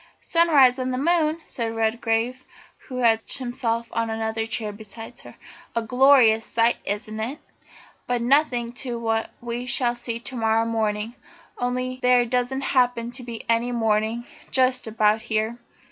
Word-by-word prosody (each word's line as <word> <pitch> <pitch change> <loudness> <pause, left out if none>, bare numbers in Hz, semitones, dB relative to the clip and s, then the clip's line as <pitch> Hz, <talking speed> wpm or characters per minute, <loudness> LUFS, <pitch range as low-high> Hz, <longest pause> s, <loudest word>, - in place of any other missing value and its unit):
"Sunrise 290 -7 +4
on 255 0 -1
the 255 - -1
Moon!" 320 +2 +2
said 230 -2 -4
Redgrave, 225 +2 0 0.4
who 255 - -6
had 230 -3 +4
stretched 225 - -5
himself 235 -2 -2
on 230 0 -1
another 225 0 -2
chair 220 -1 -2
beside 225 +3 -10
her. - - -12 0.4
"A 230 - 0
glorious 250 -2 +5
sight, 230 +1 +2
isn't 215 +2 -3
it? 240 +7 -3 0.7
But 245 -1 0
nothing 245 -3 +2
to 245 -3 -4
what 225 -1 -1
we 240 +1 -4
shall 240 -1 +1
see 235 -1 -4
to 255 +2 -6
morrow 225 -1 +2
morning 220 -1 -1 0.5
only 255 +1 -2
there 250 -1 +4
doesn't 250 +2 -1
happen 245 -3 +1
to 250 +1 -7
be 235 -2 -7
any 230 +1 +1
morning 225 0 0 0.2
just 255 -2 +2
about 215 0 +2
here." 225 +1 -2
235 Hz, 155 wpm, -24 LUFS, 225-255 Hz, 0.7 s, glorious